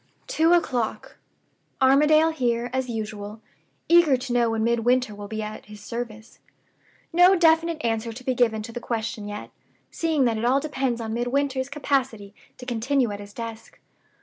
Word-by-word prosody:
"Two 325 +2 +2
o'clock. 255 -10 -1 0.6
Armadale 300 +4 +5
here 240 -5 -1
as 260 -1 -1
usual; 215 -1 -5 0.5
eager 340 -6 +5
to 250 -1 -5
know 240 -1 +3
when 225 -1 -1
Midwinter 235 0 +1
will 205 0 -8
be 220 +1 -4
at 215 0 -7
his 210 0 -12
service. 225 0 -7 0.7
No 355 +3 +6
definite 330 -1 +3
answer 225 0 -1
to 245 +3 -10
be 255 - 0
given 225 -3 +1
to 230 - -8
the 240 - -5
question 225 -2 -4
yet, 210 0 -7 0.4
seeing 315 -5 +1
that 225 -2 0
it - - -4
all 255 +3 +3
depends 270 -5 -2
on 220 -1 -4
Midwinter's 260 +2 -1
capacity 265 -8 -2 0.2
to 250 - -10
continue 250 0 0
at 205 - -6
his 205 0 -10
desk. 230 0 -8
240 Hz, 165 wpm, -24 LUFS, 220-275 Hz, 0.7 s, No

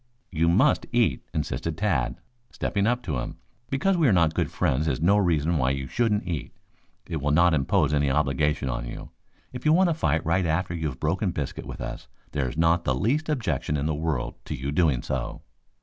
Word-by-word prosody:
"You 85 -1 +2
must 85 - +3
eat," - - +2
insisted 75 +1 -3
Tad, 85 - 0 0.3
stepping 100 0 -1
up 125 +1 0
to 75 - -2
him. - - -5 0.3
"Because 180 +8 +1
we 160 -4 +4
are - - +5
not 85 -4 +3
good - - 0
friends 75 +5 0
is 65 -4 0
no 90 +6 +4
reason 85 -5 +2
why 65 -1 +2
you 70 0 -2
shouldn't 105 - 0
eat. 80 -7 -4 0.5
It 80 -4 -3
will 75 - 0
not 85 +3 +4
impose 75 +1 +2
any 70 -1 +2
obligation 75 0 +1
on - - -3
you. - - -8 0.4
If 125 - -7
you 155 - +4
want 180 0 +4
to - - +2
fight 80 - 0
right 85 +2 +1
after 85 +2 0
you 80 -2 -2
have 65 -3 -6
broken 90 +6 0
biscuit 75 -6 -4
with - - -7
us - - -6 0.2
there's 65 -2 -2
not 85 +1 +3
the 65 - +1
least 135 - 0
objection 90 - -1
in 70 - -2
the 80 - 0
world 75 -4 -2
to - - -4
your 65 +3 -4
doing 75 -5 +2
so." 65 -2 -4
80 Hz, 210 wpm, -26 LUFS, 70-95 Hz, 0.5 s, are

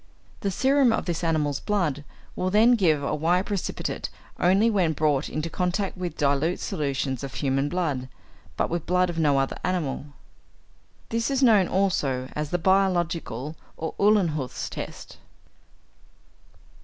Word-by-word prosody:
The 200 - -1
serum 265 +5 +3
of - - -1
this 175 -1 -2
animal's 150 -4 0
blood 160 -9 -1 0.3
will 185 - -1
then 220 +5 +5
give 160 -10 +2
a 140 - -1
white 175 +5 +1
precipitate 200 -3 -3 0.3
only 190 +5 +4
when 190 -8 +2
brought 150 -2 +1
into 155 +2 -3
contact 180 +3 -1
with 180 -2 -5
dilute 145 +4 +1
solutions 135 -3 -2
of 135 - -6
human 135 0 0
blood, 145 -8 -2 0.5
but - - 0
with 170 0 -1
the - - -23
blood 180 0 +2
of 165 - -4
no 145 -3 +3
other 135 0 -1
animal. 175 -7 -1 1.0
This 230 +2 0
is 270 -1 +1
known 210 -7 +5
also 140 -10 0
as 150 -1 -2
the 175 - 0
'biologic,' 180 -2 +1
or 130 +6 -5 0.2
Uhlenhuth's 165 - 0
test. - - -8
170 Hz, 145 wpm, -25 LUFS, 145-190 Hz, 1.0 s, then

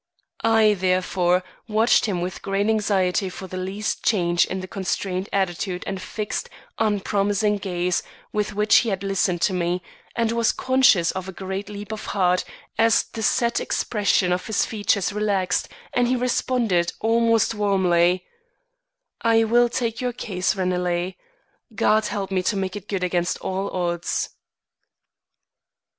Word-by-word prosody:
I, 220 -1 +5
therefore, 185 -1 +1 0.2
watched 220 +2 +3
him 185 -4 -1
with 180 +1 -4
great 195 +1 0
anxiety 195 -3 +1
for 190 - -8
the 185 - -8
least 190 +3 -3
change 175 -5 +3
in 190 - -3
the 185 - -6
constrained 190 0 -3
attitude 185 -1 -1
and 195 -1 -4
fixed, 210 +3 -4 0.3
unpromising 205 0 +1
gaze 180 -2 -1 0.3
with 210 -1 -1
which 210 +1 +5
he 230 - +2
had 195 -1 -2
listened 190 -3 0
to 190 - +2
me, 175 0 -1 0.3
and 230 -1 +1
was 230 -1 +2
conscious 260 -10 +3
of 190 0 -5
a - - -4
great 190 +2 -5
leap 205 0 -7
of 220 - -5
heart 180 -1 +3 0.4
as 225 0 +4
the 225 - -4
set 235 +2 +2
expression 200 -4 +1
of 180 - -3
his 220 -2 +1
features 205 -2 0
relaxed, 200 -3 0 0.2
and 245 -1 +2
he 255 - +2
responded 240 -7 +1
almost 230 0 +2
warmly: 185 -4 +2 1.0
"I 225 0 +4
will 240 +2 +4
take 230 -1 -2
your 250 -1 -1
case, 195 -5 -1
Ranelagh. 180 -1 -1 0.6
God 215 +2 +3
help 195 -2 -4
me 185 -1 +1
to 200 +3 0
make 190 0 -2
it 205 -1 -8
good 195 -3 -2
against 175 -1 0
all 190 +1 -2
odds." 175 -1 -2
195 Hz, 150 wpm, -23 LUFS, 185-220 Hz, 1.0 s, I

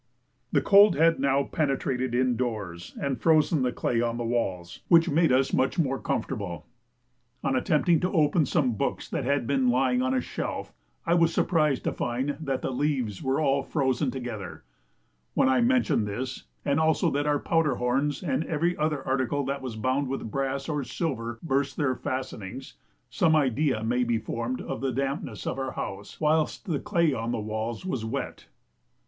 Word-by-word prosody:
The - - +2
cold 200 +1 +7
had 165 +1 +4
now 140 +1 +2
penetrated 130 -4 -1
in 125 0 +2
doors 105 -9 -4
and 135 -4 -2
frozen 160 -1 +3
the 125 -1 +1
clay 115 -1 0
on 120 0 -1
the 120 - -2
walls, 95 -7 -2
which 165 0 +5
made 160 0 +3
us 130 +1 +2
much 130 +6 +1
more 135 -5 +1
comfortable. 100 -9 -3 0.8
On 135 -1 +1
attempting 150 +5 +2
to 180 - -1
open 155 -3 +3
some 140 -6 +2
books 105 - -2
that - - -3
had 140 -1 +1
been 130 0 +2
lying 125 0 +2
on 130 +1 +1
a - - +3
shelf, - - -5 0.3
I 170 - +2
was 170 -1 +4
surprised 155 -7 +1
to - - 0
find 130 +4 -2
that 135 -4 -3
the - - -1
leaves 130 -7 -1
were 135 +2 0
all 140 -2 +2
frozen 135 -2 0
together; 120 -7 -6 0.7
when - - +4
I 130 - +3
mention 240 - +2
this, 125 +6 -5 0.2
and 140 +1 +2
also 160 -1 +2
that 145 +1 0
our 145 0 +3
powder 160 -3 +1
horns 135 +7 0
and 150 -2 0
every 170 +3 0
other 150 -2 -1
article 135 +1 0
that 140 +1 -3
was 130 -4 -5
bound 130 +5 0
with 130 -4 -4
brass 135 0 -2
or 150 -3 -1
silver 120 -5 -3
burst 140 -2 0
their 140 -4 +1
fastenings, 130 -3 -5 0.4
some 160 +5 +3
idea 135 -4 +1
may 120 +2 +1
be 120 -1 +1
formed 120 +2 -3
of - - -5
the 135 -1 0
dampness 135 -4 -3
of 135 - -2
our 135 -1 -3
house 100 +1 -6
whilst 155 0 +1
the 160 -7 -1
clay 170 -7 +1
on 115 0 -2
the - - -1
walls 110 - -4
was 130 -11 -2
wet. 110 - -5
135 Hz, 180 wpm, -27 LUFS, 120-150 Hz, 0.8 s, cold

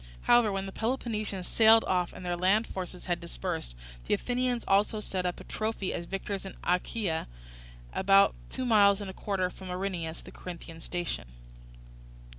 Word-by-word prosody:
However, 240 -3 +5
when 195 0 -2
the 195 - -6
Peloponnesians 215 -5 -2
sailed 225 0 +6
off 180 -2 +1
and 185 - -9
their 175 0 0
land 190 +6 +3
forces 180 -1 -6
had 175 -2 0
dispersed, - - -3 0.3
the - - +3
Athenians 245 -1 -1
also 205 +2 +3
set 185 -3 -2
up 180 - -3
a - - -9
trophy 215 -3 -2
as 170 - -4
victors 195 0 -3
in 195 - -8
Achaia, 180 -1 0 0.7
about 195 +1 +5 0.2
two 260 - -3
miles 205 -4 +5
and 200 -2 -5
a - - -13
quarter 185 -3 -1
from 190 0 -10
Erineus, 180 -3 -3
the - - -11
Corinthian 165 -2 -9
station. 175 - -3
195 Hz, 165 wpm, -30 LUFS, 180-215 Hz, 0.7 s, sailed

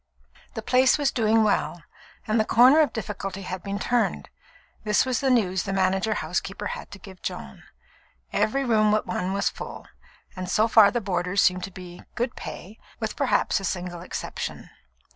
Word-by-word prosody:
The - - -5
place 255 +2 +4
was 290 -2 +1
doing 225 -2 +3
well, 175 -5 0 0.4
and 220 +1 +1
the - - +4
corner 250 +7 +6
of 300 -6 +3
difficulty 195 -3 -5
had 185 0 -5
been 200 +1 -4
turned; 240 +3 0 0.5
this 210 +2 +2
was 255 -2 0
the 270 - +1
news 190 -7 +2
the 195 - -4
manager 190 +3 +1
housekeeper - - -3
had 485 - -8
to - - -10
give 190 -2 -13
Joan. - - -6 0.7
Every 275 +5 +1
room 215 -3 +3
but 215 0 +2
one 180 +1 -2
was 200 +1 +1
full, - - -8 0.5
and 185 -1 -5
so 215 +4 +3
far 220 -3 +7
the 240 - -2
boarders 185 0 0
seemed 180 -1 +2
to 190 - -10
be 180 -1 -10
"good 240 +1 -2
pay," 205 +5 -9 0.2
with - - -3
perhaps - - +1
a - - -9
single 175 -2 -4
exception. 180 - -6
210 Hz, 180 wpm, -25 LUFS, 185-230 Hz, 0.7 s, far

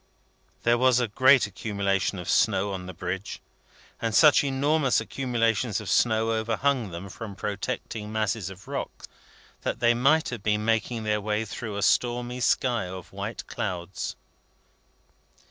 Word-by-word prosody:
There 120 0 +3
was 130 -1 +4
a 120 - +1
great 130 +4 +5
accumulation 100 -2 -1
of 90 - -7
snow 100 -3 +2
on 90 -1 -6
the 95 - -7
Bridge; 90 +3 -4 0.6
and 115 -2 -1
such 150 -2 +7
enormous 140 0 +2
accumulations 115 -4 0
of 105 -3 -5
snow 115 -1 +3
overhung 115 +2 0
them 85 +3 -7
from 100 +1 -8
protecting 105 +1 -4
masses 110 -2 -1
of 95 0 -12
rock, - - -5 0.6
that - - -3
they 120 0 +4
might 140 +7 +3
have 120 -4 -5
been 105 +1 0
making 115 0 0
their 105 -1 0
way 105 +1 -1
through 105 -1 -6
a 100 - -1
stormy 120 +2 +1
sky 120 -4 +1
of 90 0 -9
white - - -5
clouds. 90 0 -4
110 Hz, 145 wpm, -26 LUFS, 100-120 Hz, 0.6 s, such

